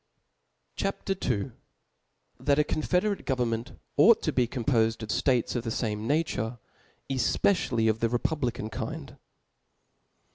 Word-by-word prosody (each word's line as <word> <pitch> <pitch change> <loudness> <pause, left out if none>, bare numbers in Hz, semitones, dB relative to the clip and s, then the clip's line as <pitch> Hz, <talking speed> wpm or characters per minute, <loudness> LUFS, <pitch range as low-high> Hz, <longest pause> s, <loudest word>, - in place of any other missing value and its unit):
C - - 0
H 195 - 0 0.2
A - - +2
P. 190 - -4
II. 100 +6 -4 0.9
That 140 -1 +2
a 150 - +5
confederate 180 +7 0
Government 120 -1 -1 0.2
ought 215 +10 +6
to 155 - +1
hecomr 125 -1 0
pofed 115 -4 +2
of 105 - -4
States 125 +1 +1
of 120 - -1
the 115 - -3
fame 110 -1 -2
Nature, 135 -7 0 0.5
ej^ecialfy 130 - +1
of 110 0 +2
the 115 - +1
republican 120 -3 -1
Kind. - - -6
125 Hz, 140 wpm, -28 LUFS, 115-150 Hz, 0.9 s, ought